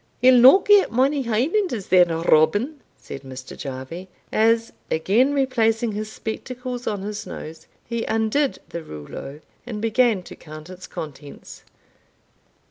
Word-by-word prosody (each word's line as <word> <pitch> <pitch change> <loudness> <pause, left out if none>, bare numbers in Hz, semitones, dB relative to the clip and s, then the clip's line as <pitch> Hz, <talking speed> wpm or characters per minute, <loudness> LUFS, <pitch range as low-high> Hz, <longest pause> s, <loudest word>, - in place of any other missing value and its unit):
"He'll 255 +2 +6
no 260 +8 +9
get 405 0 +4
mony 270 +4 +2
Hielanders 245 - -1
then, 180 -1 +6
Robin," 205 - +2 0.2
said 135 - -9
Mr. 130 -1 -9
Jarvie, 140 +7 -7 0.2
as, 225 +1 +2 0.2
again 215 - +2
replacing 235 -5 +1
his 215 +1 -5
spectacles 250 +3 -6
on 205 -3 -2
his 205 0 -5
nose, 160 +1 -9 0.2
he 235 -1 -3
undid 225 +6 0
the 170 - -5
rouleau, 135 - -9 0.2
and 225 -3 -6
began 225 -2 +2
to - - -11
count 155 +2 -11
its 185 0 -10
contents. 145 -2 -9
220 Hz, 130 wpm, -22 LUFS, 165-250 Hz, 0.2 s, no